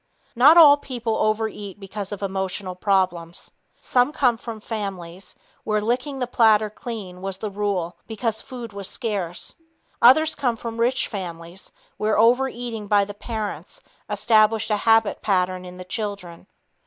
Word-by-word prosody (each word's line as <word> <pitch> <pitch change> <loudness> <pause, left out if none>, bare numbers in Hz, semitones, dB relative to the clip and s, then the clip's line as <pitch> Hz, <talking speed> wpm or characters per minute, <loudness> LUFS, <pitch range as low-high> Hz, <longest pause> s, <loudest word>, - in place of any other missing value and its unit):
Not 285 +8 +7
all 295 -4 +9
people 240 -5 -3
overeat 215 -2 -2
because 200 0 -6
of 205 -1 -6
emotional 190 -1 -3
problems. 180 -3 -1 0.3
Some 250 +3 +2
come 250 -5 +2
from 225 -1 -8
families 195 -5 -6 0.3
where 215 0 0
"licking 250 +6 -2
the 255 - -1
platter 220 -3 +3
clean" 210 -7 -7
was 195 0 -4
the 210 +1 -5
rule 195 -4 -2
because 220 -1 -2
food 240 -4 -9
was 200 -1 -5
scarce. 195 -7 -4 0.4
Others 310 +6 +6
come 245 -5 -1
from 230 0 -7
rich 250 +3 +1
families 175 -2 -8 0.3
where 215 0 0
overeating 235 -1 +1
by 205 -1 +3
the 205 - -8
parents 215 0 -6 0.3
established 220 -1 +3
a 210 - +3
habit 225 -1 +3
pattern 185 -2 0
in 180 0 -10
the 185 - -9
children. 195 -4 -6
210 Hz, 145 wpm, -23 LUFS, 190-235 Hz, 0.4 s, all